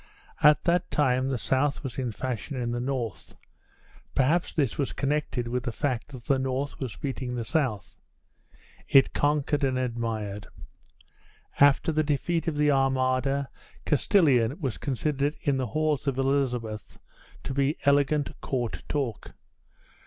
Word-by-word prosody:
At 150 0 +6
that 175 +1 +1
time 130 -2 +1
the 135 - 0
South 140 +5 0
was 135 -1 -5
in 125 -3 -2
fashion 130 +4 -4
in 120 -1 -2
the 120 - -2
North; 125 -3 -4 0.8
perhaps 155 +7 +2
this 140 -8 0
was 140 - -2
connected 135 -4 -1
with 125 +1 -1
the 120 0 -3
fact 125 -1 -2
that 130 -4 -10
the 135 0 +2
North 130 +2 -2
was 130 -5 -4
beating 130 -3 -4
the 120 - -2
South. 115 - -1 0.9
It 135 -1 +5
conquered 145 0 +1
and 130 -1 +1
admired. 115 -5 -3 1.1
After 145 +3 +5
the 155 0 +2
defeat 160 +3 -1
of 155 -3 -1
the 150 0 +4
Armada, 135 0 +1 0.4
Castilian 145 - +3
was 135 -8 -3
considered 145 +2 -1
in 140 -3 +1
the 130 -2 -1
halls 150 +4 0
of 135 -2 0
Elizabeth 125 -5 -1 0.5
to - - -4
be 140 +2 +1
elegant 145 +1 +3
court 120 -4 -3
talk. 125 -7 -3
135 Hz, 145 wpm, -27 LUFS, 125-145 Hz, 1.1 s, At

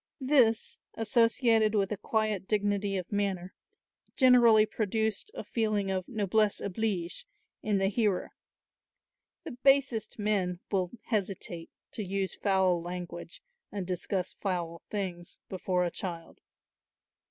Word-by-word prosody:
This, 255 -5 +3 0.2
associated 225 -1 +3
with 195 -1 +1
a 210 - -1
quiet 215 -2 -1
dignity 205 -1 0
of 185 -1 -5
manner, 195 -3 -1 0.6
generally 240 -5 +6
produced 220 - -1
a - - -5
feeling 210 -4 0
of 185 -1 -2
"noblesse 215 -1 +1
oblige" 195 - -2 0.3
in 210 -2 +1
the 195 - +1
hearer. 205 -2 0 1.1
The 325 - -6
basest 265 -2 +2
men 195 -4 0
will 185 -3 +1
hesitate 190 -6 -3 0.2
to 215 - -4
use 195 0 -2
foul 190 -3 +2
language 175 0 -7 0.3
and 200 -3 -4
discuss 180 +1 -2
foul 175 -4 -3
things 180 -4 -4
before 180 -1 0
a 175 - -2
child. 170 -3 -6
200 Hz, 120 wpm, -30 LUFS, 185-220 Hz, 1.1 s, generally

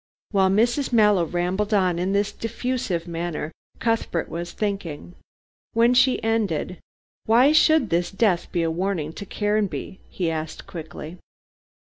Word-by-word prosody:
While 190 -3 +3
Mrs. 240 +8 +2
Mallow 210 -6 +4
rambled 185 +6 -1
on 180 -3 +2
in 185 +2 0
this 200 +1 +1
diffusive 225 -7 -3
manner, 170 -2 -4 0.3
Cuthbert 225 -7 -1
was 170 +1 -5
thinking. 190 -6 -4 0.6
When 235 +2 +4
she 255 +1 +3
ended, 205 -6 -1 0.5
"Why 245 +6 +6
should 315 -5 +4
this 175 +1 +1
death 195 -4 +1
be 170 -2 0
a 165 - 0
warning 170 -3 -2
to 200 - -8
Caranby?" 205 -2 -2
he 175 -3 -2
asked 160 0 -5
quickly. 160 0 -8
195 Hz, 135 wpm, -24 LUFS, 170-225 Hz, 0.6 s, Why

